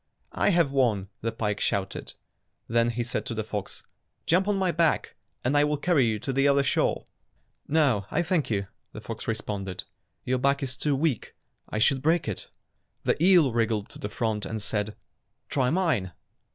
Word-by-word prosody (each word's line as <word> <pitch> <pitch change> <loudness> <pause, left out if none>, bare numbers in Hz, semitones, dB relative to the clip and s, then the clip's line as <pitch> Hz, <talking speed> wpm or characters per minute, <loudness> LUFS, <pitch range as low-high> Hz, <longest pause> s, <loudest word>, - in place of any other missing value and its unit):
"I - - +2
have 170 -7 +3
won," 115 -8 +1
the 115 - -1
pike 105 -2 -2
shouted. 95 -1 -2 0.5
Then 115 +1 +2
he 120 +1 -1
said 125 - -2
to 115 - -3
the 110 - -1
fox, 105 -2 -5 0.4
"Jump 185 +4 +3
on 205 -1 +2
my 190 -2 +2
back 165 -1 +1 0.3
and 130 +4 +1
I 145 - +5
will 150 0 +1
carry 145 -5 +3
you 110 -1 0
to 135 - -2
the 135 +2 +3
other 140 0 +4
shore." 130 - +1 0.6
"No, 135 -11 +2
I 175 - +1
thank 170 -3 0
you," 100 -3 0 0.3
the 105 - -8
fox 110 +1 -7
responded. 100 -4 -3 0.4
"Your 130 0 +1
back 140 +2 +2
is 130 -1 -2
too 145 +2 0
weak. 140 -4 -1 0.3
I - - -3
should 130 +5 +3
break 160 0 +2
it." 110 - -4 0.5
The 160 - +1
eel 175 -9 +6
wriggled 115 -3 0
to - - -12
the 105 - -4
front 110 -2 -1
and 110 +2 -3
said, 105 0 -2 0.5
"Try 130 -3 +1
mine." 155 - +1
125 Hz, 185 wpm, -27 LUFS, 110-150 Hz, 0.6 s, eel